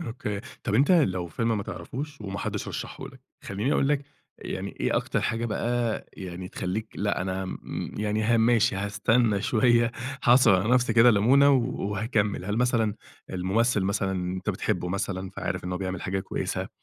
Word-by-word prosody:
أوكي، 105 -8 -4 0.2
طب 105 - -1
أنت 140 +8 +4
لو 95 - +2
فيلم 115 +7 -1
ما 100 - -2
تعرفوش 145 +6 -6
وما 100 -2 -5
حدش - - -3
رشحه - - -6
لك، - - -15 0.2
خلّيني 105 +9 -1
أقول 135 - +2
لك 145 -1 +1 0.3
يعني - - -5
إيه - - +1
أكتر - - 0
حاجة 115 +1 -1
بقى 120 0 -1
يعني 90 -1 -7
تخليك 105 +6 -3
لأ 100 +1 -1
أنا 95 0 -2
م 95 - -6
يعني 105 0 0
ها 115 +2 +3
ماشي 115 -1 +3
هاستنى 105 +2 +1
شويّة 120 0 +3 0.3
هاعصر 120 -4 +6
على 110 - -1
نفسي 125 -2 +3
كده 115 +2 +7
لمونة 130 +7 +5
وهاكمل، 105 -5 0
هل 105 +3 -2
مثلًا 115 -4 +2 0.4
الممثّل 100 +5 +1
مثلًا 100 0 0
أنت 95 +2 -2
بتحبه 90 -2 -2
مثلًا 95 0 -3
فعارف 100 - -4
إنّه 90 0 -2
بيعمل 95 -1 -4
حاجة 95 0 -1
كويّسة، - - -3
105 Hz, 170 wpm, -26 LUFS, 95-120 Hz, 0.4 s, كده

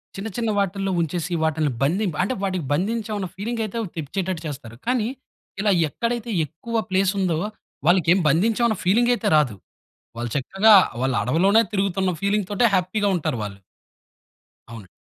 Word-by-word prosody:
చిన్న 195 +3 -5
చిన్న 230 -2 0
వాటిల్లో 195 0 0
ఉంచేసి 170 +2 -2
వాటిల్ని 155 -2 +1
బంధిం 180 +9 +1
అంటే 190 +7 0
వాటికి 185 -5 -2
బంధించామన్న 205 +4 -1
ఫీలింగ్ 230 +4 -3
అయితే 215 +2 -6 0.2
తెప్పించేటట్టు 175 +3 -3
చేస్తారు. 130 -6 -7
కానీ 245 -2 +1 0.5
ఇలా 205 +1 +2 0.2
ఎక్కడైతే 235 +5 -3 0.2
ఎక్కువ 225 +10 -3
ప్లేస్ 190 0 +2
ఉందో 180 -4 +1 0.5
వాళ్లకి 175 -1 +4
ఏ - - +2
బంధించామన్న 220 - +2
ఫీలింగ్ 230 +7 +3
అయితే 230 -3 -2
రాదు. 145 -8 +2 0.6
వాళ్ళు 120 0 -3
చక్కగా 195 +10 +4 0.3
వాళ్ళ 130 0 0
అడవిలోనే 185 - +4
తిరుగుతున్న 195 -2 0
ఫీలింగ్ 200 0 +1
తోటే 220 +4 +3
హ్యాపీగా 190 +3 +1
ఉంటారు 150 -7 -2
వాళ్ళు. 100 -2 -6 1.1
అవునండి. 115 -4 -10
190 Hz, 145 wpm, -23 LUFS, 160-215 Hz, 1.1 s, వాళ్లకి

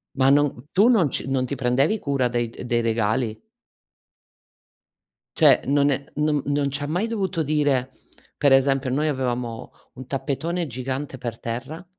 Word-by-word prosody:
Ma 135 0 +4
non 140 -2 +2
tu 210 +6 +5
non 190 - +4
ci 135 - -2
non 130 -1 0
ti 140 - -4
prendevi 135 - +1
cura 140 -7 0
dei 120 -1 -1
d 115 - -10
dei 120 -1 +1
regali? 110 0 -1 2.0
Cioè, 145 -6 +6
non 140 +1 +2
è 135 +1 -1
non 150 -1 +1
non 145 -1 0
ci 140 +1 -3
ha - - -3
mai 180 +8 -1
dovuto 195 -7 -2
dire 145 -3 +1 0.5
per 140 -2 +5
esempio, 135 0 +3
noi 150 +4 0
avevamo 125 -4 -3 0.2
un 130 0 -10
tappetone 155 +6 -2
gigante 130 +1 -4
per 115 -2 -5
terra, 135 +9 -6
135 Hz, 160 wpm, -23 LUFS, 125-150 Hz, 2.0 s, Cioè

